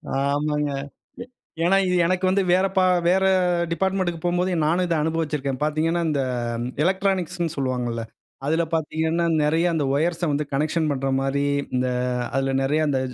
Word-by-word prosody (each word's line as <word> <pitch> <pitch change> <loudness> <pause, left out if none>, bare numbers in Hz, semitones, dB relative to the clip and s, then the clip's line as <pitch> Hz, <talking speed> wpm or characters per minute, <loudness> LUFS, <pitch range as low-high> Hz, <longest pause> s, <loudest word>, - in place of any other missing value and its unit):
ஆமாங்க. 145 +1 0 0.5
எ - - -13 0.4
ஏன்னா 190 +3 +4
இது 180 - +1
எனக்கு 185 +1 +1
வந்து 195 +1 +2
வேற 185 +1 +3
ப - - +6 0.3
வேற 190 +2 +3 0.5
டிபார்ட்மென்ட்க்கு 185 -2 -1
போம்போது 180 +1 +1
நானும் 175 +4 +2
இத 170 - 0
அனுபவிச்சிருக்கேன். 150 -5 -2
பாத்தீங்கனா 160 +3 0
இந்த 145 -3 0 0.6
எலக்ட்ரானிக்ஸ்னு 185 -3 0
சொல்வாங்கல்ல. 125 -4 -2 0.4
அதில 160 +3 +2
பார்த்தீங்கனா 160 +1 0 0.2
நிறைய 160 +3 +2
அந்த 150 -4 0
ஒயர்ஸ 170 +3 0
வந்து 150 +1 -1
கனெக்ஷன் 155 +2 0
பண்ணுகிற 135 -1 -1
மாரி 140 +1 0 0.3
இந்த 125 0 +1 0.5
அதில 135 0 0
நிறைய 150 +3 +1
அந்த 135 -2 +1
160 Hz, 140 wpm, -23 LUFS, 140-175 Hz, 0.6 s, ப